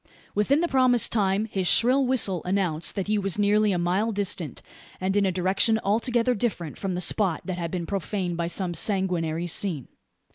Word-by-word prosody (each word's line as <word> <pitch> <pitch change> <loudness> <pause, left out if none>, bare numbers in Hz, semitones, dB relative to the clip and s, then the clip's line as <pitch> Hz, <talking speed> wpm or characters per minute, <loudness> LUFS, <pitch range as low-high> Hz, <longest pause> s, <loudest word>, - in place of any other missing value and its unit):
Within 270 +9 +1
the 345 - +1
promised 255 -5 +3
time 200 -1 +1
his 195 -4 -2
shrill 255 +8 +4
whistle 205 -9 +2
announced 180 -4 0
that 195 -3 -2
he 210 0 0
was 195 -1 -1
nearly 210 +1 +2
a 180 - 0
mile 185 +6 0
distant, 190 - -2 0.4
and 190 +1 -1
in 200 -1 +2
a - - 0
direction 190 +5 +1
altogether 235 +4 +1
different 200 - -3
from 190 -2 -4
the 180 - -3
spot 185 -1 +1
that 185 -2 -4
had 170 -1 -3
been 175 -1 -4
profaned 190 -1 -3
by 170 0 -2
some 175 +1 -1
sanguinary 175 -4 -1
scene. 170 -5 -2
195 Hz, 185 wpm, -25 LUFS, 175-215 Hz, 0.4 s, shrill